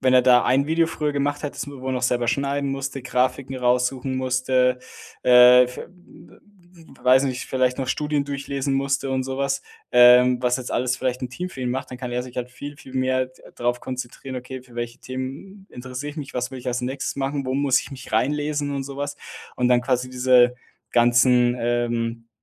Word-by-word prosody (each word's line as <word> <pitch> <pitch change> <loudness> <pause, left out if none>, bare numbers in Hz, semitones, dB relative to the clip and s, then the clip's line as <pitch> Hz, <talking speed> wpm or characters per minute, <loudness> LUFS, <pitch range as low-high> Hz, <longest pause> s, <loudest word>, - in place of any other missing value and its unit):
wenn 130 -1 +3
er 125 - +6
da 125 -1 +5
ein 140 +3 +2
Video 165 0 +3
früher 150 -2 -2
gemacht 145 +1 -1
hätte, 145 - -4
das - - -5
man 140 -2 -9
wohl 130 0 -3
noch 125 - -2
selber 120 -1 +1
schneiden 140 +2 0
musste, 135 0 -4
Grafiken 130 +1 -1
raussuchen 125 +1 0
musste, 130 0 +1 0.5
äh, 125 0 +8
f 125 0 -8
w - - -5 0.5
w - - -22 0.6
weiß 130 +2 +5
ich - - 0
nicht, 125 - -5
vielleicht 130 -1 0
noch 130 -2 -3
Studien 150 0 0
durchlesen 140 -1 -3
musste 135 0 -1
und 130 -1 -1
so 135 0 -4
was, 140 0 -1 0.3
ähm, 125 0 +6
was 125 +1 +2
jetzt 125 - -6
alles 125 0 0
vielleicht 130 0 -2
'n 125 - -2
Team 180 +8 -5
für 135 - -10
ihn 125 -1 -1
macht, 130 +1 -4
dann 125 - -8
kann 125 -1 -5
er 125 0 -1
sich 125 -1 -12
halt 125 0 -4
viel, 145 +3 -8
viel 130 -3 -14
mehr 130 0 +1
d 130 0 -22
drauf 120 0 -1
konzentrieren: 130 +1 -6
„Okay, 125 +1 -7
für 125 -2 -19
welche 120 +1 -4
Themen 135 +10 -7
interessiere 125 +3 -6
ich 150 - -14
mich? 140 -3 -7
Was 125 0 -2
will 130 - -6
ich 125 - -11
als 125 0 -1
nächstes 135 +2 -3
machen, 140 0 -2
wo 130 - -1
muss 140 -2 +3
ich - - -10
mich 130 -5 -10
reinlesen?“ 145 +4 0
Und 135 -1 -3
so 140 0 -8
was. 145 0 -4 0.4
Und 125 - +1
dann 125 -1 +4
quasi 125 0 -1
diese 125 -1 +4 0.4
ganzen, 120 +1 +4
ähm, 115 -1 -1
130 Hz, 215 wpm, -23 LUFS, 125-140 Hz, 0.6 s, äh